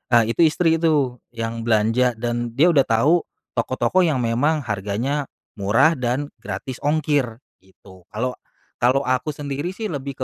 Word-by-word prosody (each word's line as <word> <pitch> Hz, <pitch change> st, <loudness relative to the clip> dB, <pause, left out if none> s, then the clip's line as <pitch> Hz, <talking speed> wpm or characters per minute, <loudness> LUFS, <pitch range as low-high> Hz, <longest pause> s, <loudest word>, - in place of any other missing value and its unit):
eee, 115 Hz, -1 st, +4 dB
itu 170 Hz, -, 0 dB
istri 165 Hz, +1 st, +2 dB
itu 145 Hz, -7 st, +1 dB, 0.2 s
yang 115 Hz, 0 st, -4 dB
belanja 115 Hz, +3 st, +2 dB
dan 120 Hz, 0 st, -3 dB
dia 165 Hz, +6 st, +5 dB
udah 140 Hz, -4 st, +3 dB
tahu 145 Hz, +10 st, +3 dB, 0.2 s
toko-toko 125 Hz, +7 st, 0 dB
yang 155 Hz, -9 st, +2 dB
memang 145 Hz, +6 st, +1 dB
harganya 110 Hz, +8 st, -2 dB, 0.3 s
murah 115 Hz, +11 st, +4 dB
dan 125 Hz, +4 st, -1 dB
gratis 130 Hz, -3 st, -6 dB
ongkir 145 Hz, -5 st, 0 dB, 0.2 s
gitu. 95 Hz, -1 st, -19 dB
Kalau 125 Hz, +4 st, -2 dB, 0.5 s
kalau 130 Hz, +3 st, +3 dB
aku 130 Hz, +4 st, -1 dB
sendiri 145 Hz, +5 st, -4 dB
sih 215 Hz, -3 st, -4 dB
lebih 140 Hz, -2 st, -5 dB
130 Hz, 145 wpm, -22 LUFS, 115-150 Hz, 0.5 s, dia